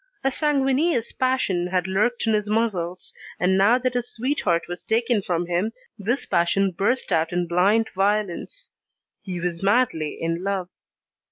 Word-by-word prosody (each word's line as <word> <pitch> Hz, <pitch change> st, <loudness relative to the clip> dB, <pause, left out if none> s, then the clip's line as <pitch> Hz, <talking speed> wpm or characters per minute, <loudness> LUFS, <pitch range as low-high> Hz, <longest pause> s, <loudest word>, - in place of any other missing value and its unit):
A 270 Hz, -, +2 dB
sanguineous 275 Hz, -2 st, +1 dB
passion 255 Hz, -9 st, 0 dB
had 180 Hz, -1 st, 0 dB
lurked 215 Hz, +7 st, 0 dB
in 225 Hz, -, +2 dB
his 210 Hz, -1 st, 0 dB
muscles, 190 Hz, -6 st, -1 dB, 0.3 s
and 185 Hz, +1 st, +3 dB
now 200 Hz, +6 st, +5 dB
that 255 Hz, 0 st, -1 dB
his 245 Hz, -1 st, -2 dB
sweetheart 225 Hz, -, 0 dB
was 175 Hz, 0 st, -6 dB
taken 230 Hz, -1 st, +1 dB
from 175 Hz, -2 st, -1 dB
him, 175 Hz, +6 st, -1 dB, 0.2 s
this 230 Hz, +5 st, -2 dB
passion 190 Hz, +3 st, +2 dB
burst 205 Hz, +9 st, -1 dB
out 160 Hz, 0 st, +2 dB
in 175 Hz, 0 st, 0 dB
blind 195 Hz, +6 st, +3 dB
violence. 205 Hz, -, -1 dB, 0.5 s
He 180 Hz, -3 st, -5 dB
was 170 Hz, -1 st, -3 dB
madly 195 Hz, -8 st, +1 dB
in 165 Hz, +2 st, -2 dB
love. 195 Hz, -2 st, -2 dB
200 Hz, 155 wpm, -24 LUFS, 175-240 Hz, 0.5 s, now